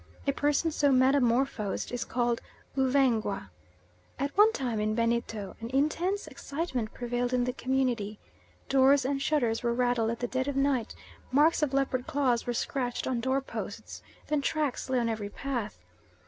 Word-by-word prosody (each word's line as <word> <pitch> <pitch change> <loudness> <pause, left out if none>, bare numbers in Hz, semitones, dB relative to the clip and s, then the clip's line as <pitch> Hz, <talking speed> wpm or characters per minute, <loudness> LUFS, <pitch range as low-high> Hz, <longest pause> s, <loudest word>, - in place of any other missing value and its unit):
A 280 - +3
person 290 +3 +1
so 290 -2 +2
metamorphosed 255 -4 +2
is 245 0 -3
called 240 -1 0 0.3
'Uvengwa.' 265 -4 +1 0.7
At 280 +1 -2
one 420 +2 +7
time 245 - -2
in 215 +1 0
Benito 230 -3 -1
an 230 0 -6
intense 320 +9 0
excitement 280 -5 -4
prevailed 245 0 -2
in 245 - +2
the 250 0 -1
community. 250 -6 -1 0.5
Doors 270 0 +4
and 275 +1 -1
shutters 250 -7 +1
were 235 -1 0
rattled 245 -2 +1
at 230 0 -3
the 245 - -1
dead 260 +2 -1
of 285 - -2
night, 275 -4 +1 0.4
marks 300 +5 +4
of 300 -3 +1
leopard 270 -2 0
claws 255 -5 +1
were 245 - 0
scratched 245 -1 -2
on 255 -2 0
door 260 +2 +1
posts. - - -7 0.2
Then 300 -1 0
tracks 290 -3 -1
lay 260 - +2
on 235 -1 +1
every 215 -3 -3
path. 240 -2 -4
255 Hz, 160 wpm, -29 LUFS, 235-280 Hz, 0.7 s, one